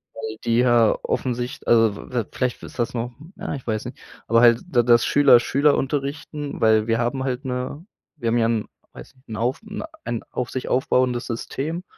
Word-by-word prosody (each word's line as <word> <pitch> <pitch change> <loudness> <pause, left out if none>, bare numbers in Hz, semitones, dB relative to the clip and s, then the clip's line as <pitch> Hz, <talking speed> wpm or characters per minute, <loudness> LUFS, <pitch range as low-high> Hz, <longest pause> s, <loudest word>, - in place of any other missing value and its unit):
Weil 110 -1 -6
die 115 0 +1
ja 120 -3 +4
offensich 125 -1 -2
also 115 -2 +5 0.2
v 120 -4 -1
vielleicht 125 -1 -2
ist - - -11
das 120 - 0
noch, 120 0 -3 0.2
ja, - - -5
ich 135 - -9
weiß 110 -2 -2
nicht - - -8 0.3
aber 115 +1 +4
halt 120 -1 +6
d 125 -9 +2
das 120 -1 +5
Schüler, 140 -4 +6
Schüler 140 +4 +2
unterrichten, 145 +1 -3
weil 110 0 +4
wir 115 0 +2
haben 130 +3 -1
halt 130 +1 -3
'ne 130 +6 -4 0.3
wir 125 -7 -4
haben 115 +1 +2
ja 115 - +3
'n, 115 -2 0 0.3
weiß - - -12
nicht, 130 +1 -29
'n 110 - -5
auf 120 - -1
'n 210 -1 -6 0.2
ein 115 - -3
auf 125 -1 -3
sich 130 - -4
aufbauendes 125 -1 +1
System. 145 +8 -4
125 Hz, 200 wpm, -23 LUFS, 115-135 Hz, 0.3 s, halt